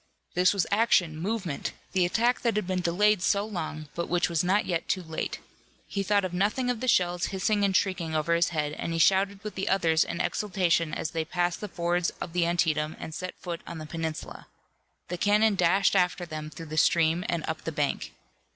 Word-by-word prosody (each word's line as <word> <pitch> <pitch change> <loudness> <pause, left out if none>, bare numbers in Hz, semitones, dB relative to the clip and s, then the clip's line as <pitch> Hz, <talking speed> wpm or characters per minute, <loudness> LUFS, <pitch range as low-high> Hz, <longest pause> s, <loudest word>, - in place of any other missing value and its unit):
This 180 +1 +4
was 195 -4 +1
action, 200 -7 +3
movement, 185 -2 -3 0.2
the 180 -2 +2
attack 235 +7 +1
that 235 -3 +1
had 210 - 0
been 185 0 -1
delayed 195 +3 +2
so 200 +1 +2
long 155 -7 -5
but 170 - -3
which 175 0 +1
was 170 -1 +1
not 190 +4 +2
yet 170 -3 -2
too 185 - 0
late. 160 -1 -4 0.5
He 200 - -3
thought 195 -2 +1
nothing 215 +7 +1
of 240 - -4
the 255 - -3
shells 180 -5 +2
hissing 205 +2 0
and 195 -1 +4
shrieking 175 -5 -1
over 155 +2 +1
his 170 +1 +3
head, 150 -3 -2
and 165 - -2
he - - -1
shouted 195 +3 +3
with 210 - -5
the 195 - -2
others 165 -4 +3
in 170 - -5
exultation 180 -6 +1
as 155 - -3
they 165 -1 -1
passed 175 +1 -1
the 210 - -3
fords 175 0 0
of 165 - -6
the 175 -1 +2
Antietam 160 -3 +1
and 160 - -7
set 185 +3 -5
foot 170 -2 -6
on 170 - -6
the 155 - -7
peninsula. 160 0 -5 0.6
The 180 0 -4
cannon 210 +2 +4
dashed 190 +1 +3
after 180 0 +2
them 155 -2 -6
through 165 +1 -9
the - - -3
stream 165 +2 +3
and 170 -2 -1
up 160 0 -3
the 165 - -3
bank. 145 -2 -2
175 Hz, 210 wpm, -27 LUFS, 165-195 Hz, 0.6 s, This